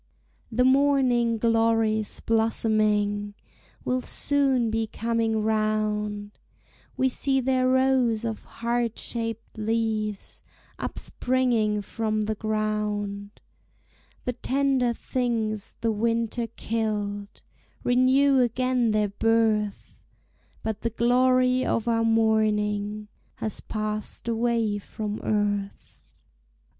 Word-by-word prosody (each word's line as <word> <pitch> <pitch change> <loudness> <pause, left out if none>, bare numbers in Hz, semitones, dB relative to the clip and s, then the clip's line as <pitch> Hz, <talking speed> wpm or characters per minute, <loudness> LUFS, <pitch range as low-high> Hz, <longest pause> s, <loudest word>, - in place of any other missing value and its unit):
The 250 +3 +2
morning 260 -4 +3
glory's 225 -1 +1
blossoming 215 -2 +1 0.5
Will 255 0 0
soon 270 -5 +1
be 225 0 -1
coming 225 -1 -1
round, 210 -1 -1 0.6
We 260 - +3
see 270 +1 +2
their 255 0 +1
rows 255 -3 +2
of 220 -2 -4
heart 235 0 -2
shaped 230 -1 -4
leaves 215 -2 -2 0.4
Upspringing 235 -5 0
from 215 +1 -2
the 215 +1 -1
ground; 210 -1 -3 0.8
The 250 - -1
tender 260 0 +1
things 225 -4 -2
the 230 - +1
winter 230 +2 -1
killed 210 -3 -3 0.4
Renew 260 +2 +4
again 250 0 +1
their 210 -1 +1
birth, 215 0 0 0.6
But 220 -1 -3
the 230 - 0
glory 255 +2 +3
of 230 - -1
our 230 -1 +2
morning 215 -2 +1 0.3
Has 220 - -3
passed 215 +1 -4
away 230 -2 0
from 210 +1 -5
earth. 205 -1 -2
225 Hz, 95 wpm, -26 LUFS, 215-245 Hz, 0.8 s, Renew